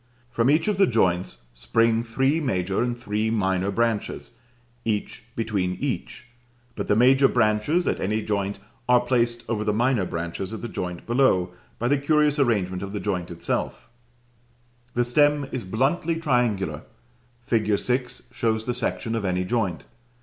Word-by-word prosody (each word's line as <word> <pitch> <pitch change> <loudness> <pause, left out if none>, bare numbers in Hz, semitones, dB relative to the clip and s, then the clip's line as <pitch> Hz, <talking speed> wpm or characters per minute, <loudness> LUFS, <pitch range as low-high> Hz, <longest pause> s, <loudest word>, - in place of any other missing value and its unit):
From 120 +1 +2
each 155 +5 +3
of 210 -3 +1
the 195 - +5
joints 90 - 0
spring 115 - +2
three 135 +6 +1
major 95 - -1
and 120 0 -1
three 110 -2 -1
minor 95 -3 0
branches, 115 +1 -1 0.5
each 105 -2 -2
between 100 -5 -1
each; 135 -2 -4 0.5
but - - -4
the 105 - +3
major 135 +4 +5
branches, 120 +10 +1
at - - 0
any 105 +3 -1
joint, 100 -1 -1 0.3
are 125 -1 +6
placed 120 -1 0
over 105 -2 -1
the 105 - +1
minor 120 -2 +2
branches 85 +4 -4
at 110 - -7
the - - -2
joint 90 -5 -5
below, 115 -8 +2 0.3
by 120 - -1
the 140 +2 +2
curious 150 0 +2
arrangement 95 -8 +1
of 100 0 -6
the 105 - -2
joint 90 -5 -2
itself 85 -1 -3 1.1
the 120 - +3
stem 145 +3 +3
is 125 - -3
bluntly 135 - 0
triangular; 120 - 0 0.6
fig. 110 -3 +1
6 125 +2 -2
shows 115 -2 -1
the 125 - -1
section 115 -1 -2
of 115 -2 -1
any 90 -1 0
joint. 95 - -1
115 Hz, 155 wpm, -24 LUFS, 100-125 Hz, 1.1 s, are